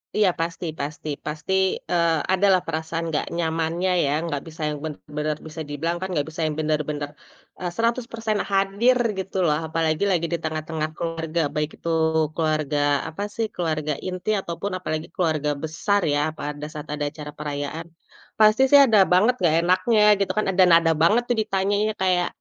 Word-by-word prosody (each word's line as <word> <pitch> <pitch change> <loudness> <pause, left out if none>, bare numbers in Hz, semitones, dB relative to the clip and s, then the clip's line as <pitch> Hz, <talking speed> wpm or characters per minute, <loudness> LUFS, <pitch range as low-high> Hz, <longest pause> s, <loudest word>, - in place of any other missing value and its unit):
Iya 210 -3 +4
pasti 165 +1 -3
pasti 150 +2 -5 0.2
pasti, 150 +4 -3 0.4
eee, 170 -2 +2
ada 190 +2 +3
lah 185 - +3
perasaan 160 +1 -3
nggak 150 - 0
nyamannya 165 +2 0
ya, 140 - 0
nggak 145 -4 -3
bisa 160 0 -10
yang 150 -1 -4
benar-benar, 150 0 -4
bisa 160 +1 -7
dibilang 165 +4 -2
kan 190 - -2
gak 145 0 0
bisa 165 +1 -6
yang 155 - -3
benar-benar, 150 -1 -1 0.5
e - - -8
100% 230 -2 -1
hadir 200 +6 +3 0.2
gitu 190 0 -6
loh, 150 -2 +2
apalagi 160 +1 0
lagi 170 -2 +1
di - - +1
tengah-tengah 155 0 -3
keluarga, 165 0 -2
baik 150 0 0
itu 170 - -5 0.5
keluarga 155 -2 0 0.3
apa 195 +6 -5
sih 225 - 0
keluarga 155 -3 -1
inti 185 +2 -4
ataupun 170 +3 -4
apalagi 155 -3 -3
keluarga 155 -5 0
besar 200 +6 0
ya, 145 - +2 0.2
pada 150 0 -5
saat 150 -1 -7
ada 150 -1 -2
acara 150 -1 -8
perayaan. 145 +2 -4 0.5
Pasti 215 +3 +5
sih 285 - +9
ada 225 -4 +4
banget 200 +8 +5
nggak 160 -2 +3
enaknya 185 +6 +3 0.2
gitu 200 - +1
kan, 215 - +2
ada 185 0 +4
nada 165 -1 +5
banget 210 +9 +5
tuh 245 - +3
ditanyanya 205 +1 0
kayak 180 -2 +2
165 Hz, 170 wpm, -23 LUFS, 155-190 Hz, 0.5 s, sih